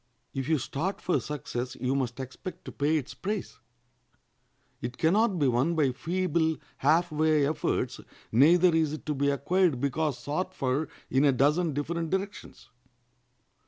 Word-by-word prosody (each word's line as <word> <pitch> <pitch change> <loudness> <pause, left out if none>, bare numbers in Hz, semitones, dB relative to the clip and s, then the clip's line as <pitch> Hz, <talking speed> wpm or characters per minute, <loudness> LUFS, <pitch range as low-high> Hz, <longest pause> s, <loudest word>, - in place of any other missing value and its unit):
If 135 0 -3
you 160 - +4
start 160 +8 -3
for 180 - +1
success 130 -3 -4
you 130 +1 0
must 130 -2 -2
expect 165 +7 -7
to - - -6
pay 150 +3 +1
its 140 - -5
price. 205 0 -4 1.2
It 125 - -5
can 165 +1 +3
not 215 -2 +3
be 145 -4 +2
won 130 +7 +2
by 145 -5 +3
feeble, 160 +3 0 0.2
half 170 +1 +3
way 155 -1 +3
efforts, 155 +3 -1 0.3
neither 170 +9 +5
is 160 -2 +2
it 155 - -7
to 150 - -1
be 140 0 +1
acquired 155 +1 +2
because 140 +1 0
sought 180 +8 -3
for 135 +3 -1 0.2
in 135 +2 +3
a 145 - +6
dozen 150 +5 +2
different 165 +3 -2
directions. 195 +3 -5
155 Hz, 160 wpm, -28 LUFS, 135-170 Hz, 1.2 s, a